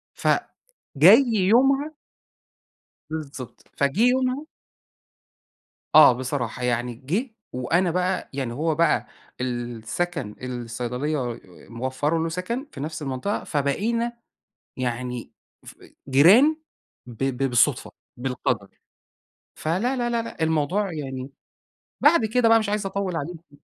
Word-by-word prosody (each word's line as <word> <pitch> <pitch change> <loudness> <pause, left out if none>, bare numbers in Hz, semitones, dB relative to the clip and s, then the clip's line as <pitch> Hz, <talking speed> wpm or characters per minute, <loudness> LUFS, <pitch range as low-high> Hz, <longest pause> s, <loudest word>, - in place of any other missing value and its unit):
ف - - -4 0.7
جاي 200 - +8 0.3
يومها 275 +6 +3 1.2
بالضبط. 145 -5 -7
فجِه 140 +9 +1
يومها 260 +3 0 1.5
آه 155 -3 +10
بصراحة. 125 -1 -3
يعني 120 0 0
جِه 185 - -3 0.2
وأنا 165 +8 +1
بقى 180 +1 -1
يعني 130 -4 -3
هو 155 +4 0
بقى 165 -1 +2 0.3
السَكَن 120 +3 -3
الصيدلية 125 +1 -3 0.3
موفّرة 130 +7 -1
له 165 - -1
سَكَن 205 - -3
في - - -9
نفس 155 +3 -5
المنطقة، 135 +9 -3
فبقينا 230 +12 -1 0.6
يعني 125 -1 -3 0.3
ف - - -12 0.3
جيران 200 - +6 0.5
ب 120 +1 -7
ب 135 0 -1
بالصُدفة، 120 -1 +2 0.3
بالقَدَر. 125 -5 -2 0.9
فلا، 195 +12 -1
لا، 240 -1 -1
لا، 235 -1 0
لأ 200 - -7
الموضوع 160 +5 0
يعني 135 -3 -5 0.7
بعد 295 -4 +5
كده 230 +2 +2
بقى 225 0 +6
مش 215 -2 -2
عايز 210 -1 -1
أطوّل 195 -2 -2
عليكِ. 160 -1 -7
155 Hz, 110 wpm, -24 LUFS, 125-205 Hz, 1.5 s, آه